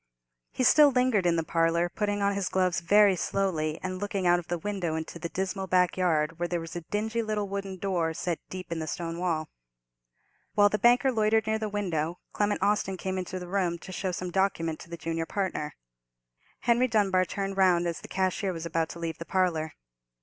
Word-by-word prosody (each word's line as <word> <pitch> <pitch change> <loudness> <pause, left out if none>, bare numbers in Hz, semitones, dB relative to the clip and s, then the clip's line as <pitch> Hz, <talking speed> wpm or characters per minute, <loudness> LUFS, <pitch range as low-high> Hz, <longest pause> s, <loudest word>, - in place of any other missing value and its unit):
He - - -1
still 295 +3 +7
lingered 250 -8 +2
in 170 - +3
the 165 - 0
parlour, 165 +1 +2
putting 205 +2 -1
on 200 0 +2
his 200 -1 -1
gloves 185 -2 +1
very 200 +3 +5
slowly, 165 -5 -1
and 185 0 -3
looking 200 -2 -2
out 175 0 +5
of 170 - -10
the 175 - -1
window 180 -3 -2
into 160 +1 -5
the 170 - -4
dismal 190 +1 -3
backyard, 175 -3 +2
where 175 - 0
there 175 0 -1
was 165 0 -8
a 175 - -3
dingy 220 +6 -2
little 215 -2 -2
wooden 195 -1 -4
door 180 -4 0
set 175 -1 -2
deep 185 -2 -7
in 165 - -2
the 160 - -4
stone 165 +1 -4
wall. 165 -4 -1 1.1
While 205 -1 +6
the 210 - -1
banker 245 +3 +5
loitered 220 -1 +2
near 220 0 0
the 215 -1 -2
window, 175 -5 -2 0.2
Clement 205 -1 0
Austin 200 -2 +1
came 190 0 -3
into 185 0 -4
the 180 -1 -7
room, 180 -2 0
to 185 - -10
show 185 0 -2
some 180 0 -4
document 170 -4 0
to - - -12
the 170 - -6
junior 165 0 -3
partner. 185 -7 -2 0.9
Henry 240 +1 +3
Dunbar 200 -5 +3
turned 195 +1 -4
round 180 -2 +4
as 170 -1 -3
the - - -9
cashier 190 +1 0
was 165 -2 -5
about 165 -1 -1
to 170 - -8
leave 165 -1 -4
the 165 - -6
parlour. 170 -5 0
185 Hz, 210 wpm, -28 LUFS, 170-200 Hz, 1.1 s, still